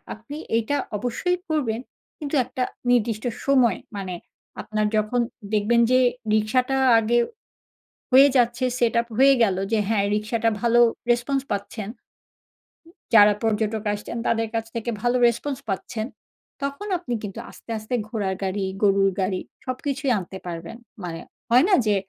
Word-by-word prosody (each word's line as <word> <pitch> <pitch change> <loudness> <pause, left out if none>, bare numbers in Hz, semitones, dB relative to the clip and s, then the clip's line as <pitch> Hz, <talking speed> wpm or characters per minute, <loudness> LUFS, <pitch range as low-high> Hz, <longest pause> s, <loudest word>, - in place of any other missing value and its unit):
আপনি 230 +7 -10 0.2
এইটা 230 +6 0 0.2
অবশ্যই 245 - -1
করবেন। 255 -8 0 0.4
কিন্তু 295 0 -5
একটা 255 +1 -4 0.3
নির্দিষ্ট 225 -2 +1 0.2
সময়, 260 -4 +3 0.2
মানে 190 -2 -4 0.5
আপনার 215 0 -1
যখন 215 +3 +1 0.3
দেখবেন 215 +3 +3
যে 255 0 +5 0.3
রিক্সাটা 250 +5 +1 0.2
আগে 225 +2 +2 0.9
হয়ে 270 +2 +8
যাচ্ছে, 240 +1 +2 0.2
সেটআপ 235 0 +2
হয়ে 275 +1 +7
গেলো, 190 -3 +1
যে 225 - +3
হ্যাঁ, 205 -3 +2
রিক্সাটা 220 +2 0
ভালো 235 0 +4 0.3
রেসপন্স 255 +3 +1
পাচ্ছেন 200 +1 -4 1.3
যারা 210 -1 +8
পর্যটক 220 -1 0
আসছেন, 210 +3 -6
তাদের 225 0 +1
কাছ 225 0 -1
থেকে 230 +1 -3
ভালো 245 +1 +2
রেসপন্স 250 +4 -2
পাচ্ছেন। 215 +4 -3 0.6
তখন 280 +9 -4
আপনি 335 -9 -5
কিন্তু 205 +2 -6
আস্তে, - - -16
আস্তে 215 +3 -7
ঘোড়ার 200 -4 -2
গাড়ি, 195 +1 -1 0.2
গরুর 195 -1 +4
গাড়ি 185 0 -1 0.2
সবকিছুই 270 +1 -2
আনতে 190 +1 -8
পারবেন। 170 +5 -6 0.3
মানে 165 -2 -5 0.3
হয়না? 325 - +5
যে 210 -1 +3
230 Hz, 135 wpm, -24 LUFS, 210-250 Hz, 1.3 s, হয়ে